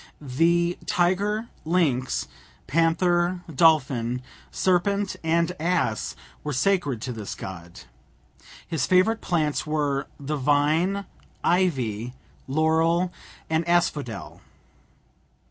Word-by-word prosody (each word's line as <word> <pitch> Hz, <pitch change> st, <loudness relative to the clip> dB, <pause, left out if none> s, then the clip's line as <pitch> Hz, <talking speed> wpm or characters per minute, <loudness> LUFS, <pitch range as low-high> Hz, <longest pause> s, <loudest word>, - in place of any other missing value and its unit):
The 170 Hz, +5 st, +1 dB
tiger, 205 Hz, +6 st, +1 dB
lynx, 155 Hz, -7 st, +1 dB, 0.4 s
panther, 175 Hz, +4 st, +2 dB
dolphin, 130 Hz, -6 st, +3 dB, 0.3 s
serpent, 195 Hz, +2 st, +1 dB
and 170 Hz, +1 st, +2 dB
ass 160 Hz, -10 st, 0 dB, 0.3 s
were 150 Hz, -, -3 dB
sacred 140 Hz, -, +1 dB
to 125 Hz, -, -3 dB
this 110 Hz, -3 st, -6 dB
god. 85 Hz, -2 st, -9 dB, 0.9 s
His 160 Hz, -7 st, -1 dB
favourite 185 Hz, +5 st, +3 dB
plants 155 Hz, -4 st, 0 dB
were 145 Hz, -3 st, 0 dB
the 145 Hz, +2 st, -3 dB
vine, 155 Hz, +8 st, +2 dB, 0.4 s
ivy, 125 Hz, -, 0 dB, 0.3 s
laurel, 160 Hz, +5 st, +2 dB, 0.3 s
and 160 Hz, +1 st, +1 dB
asphodel. 150 Hz, -10 st, -1 dB
160 Hz, 90 wpm, -25 LUFS, 135-175 Hz, 0.9 s, dolphin